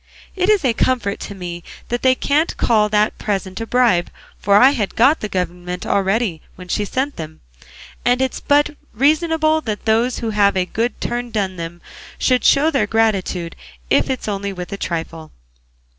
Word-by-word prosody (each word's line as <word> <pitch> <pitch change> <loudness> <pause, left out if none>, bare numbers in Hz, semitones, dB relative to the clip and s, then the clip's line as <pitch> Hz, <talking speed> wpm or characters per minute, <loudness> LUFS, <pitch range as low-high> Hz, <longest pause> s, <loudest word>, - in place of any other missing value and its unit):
It 370 +1 +1
is 415 -8 +3
a 245 - +3
comfort 225 -4 0
to 200 - -7
me 175 -2 -7 0.3
that 240 0 -2
they 260 0 +4
can't 295 +5 0
call 215 -3 +2
that 210 0 +1
present 190 -1 -3
a 225 - -4
bribe; 235 -9 +2 0.3
for 200 0 +2
I 255 +6 +7
had 220 -8 -2
got 270 +7 +4
the 215 - -4
government 180 -1 -4
already 195 -3 0
when 180 -1 -12
she 210 - 0
sent 265 +7 -2
them, 155 -1 -8 0.6
and 245 +1 +2
it's 265 0 -1
but 290 +1 +2 0.2
reasonable 310 +4 +2
that 215 -7 -5
those 230 +3 +2
who 230 -2 -3
have 200 -2 +3
had 185 - +2
a - - -7
good 230 +6 -2
turn 240 0 -3
done 200 -4 -2
them 170 +1 -7 0.4
should 255 -1 +2
show 295 +3 +4
their 235 -9 +1
gratitude, 195 -6 0 0.4
if - - +3
it's 260 -4 -3
only 200 -1 -2
with 180 0 -7
a - - -4
trifle. 165 -3 -5
215 Hz, 185 wpm, -19 LUFS, 190-255 Hz, 0.6 s, I